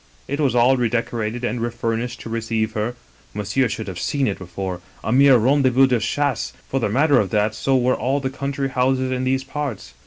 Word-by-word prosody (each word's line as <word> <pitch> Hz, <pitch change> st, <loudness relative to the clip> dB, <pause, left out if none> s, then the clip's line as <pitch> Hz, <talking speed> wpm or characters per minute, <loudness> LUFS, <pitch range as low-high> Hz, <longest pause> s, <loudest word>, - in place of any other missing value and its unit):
It 140 Hz, +2 st, -3 dB
was 135 Hz, -5 st, +1 dB
all 125 Hz, +2 st, +4 dB
redecorated 115 Hz, -1 st, -1 dB
and 120 Hz, -1 st, -2 dB
refurnished 120 Hz, 0 st, -2 dB
to -, -, -8 dB
receive 115 Hz, -1 st, -1 dB
her 110 Hz, +2 st, -2 dB, 0.4 s
(monsieur 105 Hz, +6 st, 0 dB
should 110 Hz, +1 st, -4 dB
have 90 Hz, -3 st, -5 dB
seen 140 Hz, -, 0 dB
it 100 Hz, -, -2 dB
before, 90 Hz, 0 st, -5 dB, 0.2 s
a -, -, -2 dB
mere 135 Hz, +1 st, +6 dB
rendezvous'de 130 Hz, 0 st, +3 dB
chasse 140 Hz, +3 st, -1 dB
— -, -, -32 dB
for 135 Hz, -, 0 dB
the 115 Hz, -, 0 dB
matter 140 Hz, +6 st, +4 dB
of 100 Hz, -, 0 dB
that 105 Hz, +2 st, +1 dB
so 135 Hz, +4 st, +1 dB
were 125 Hz, 0 st, +2 dB
all 135 Hz, +3 st, 0 dB
the 130 Hz, -1 st, -3 dB
country 140 Hz, 0 st, -3 dB
houses 130 Hz, 0 st, +1 dB
in 130 Hz, 0 st, -1 dB
these 130 Hz, +1 st, +1 dB
parts). 135 Hz, -, -5 dB
125 Hz, 205 wpm, -21 LUFS, 110-135 Hz, 0.4 s, mere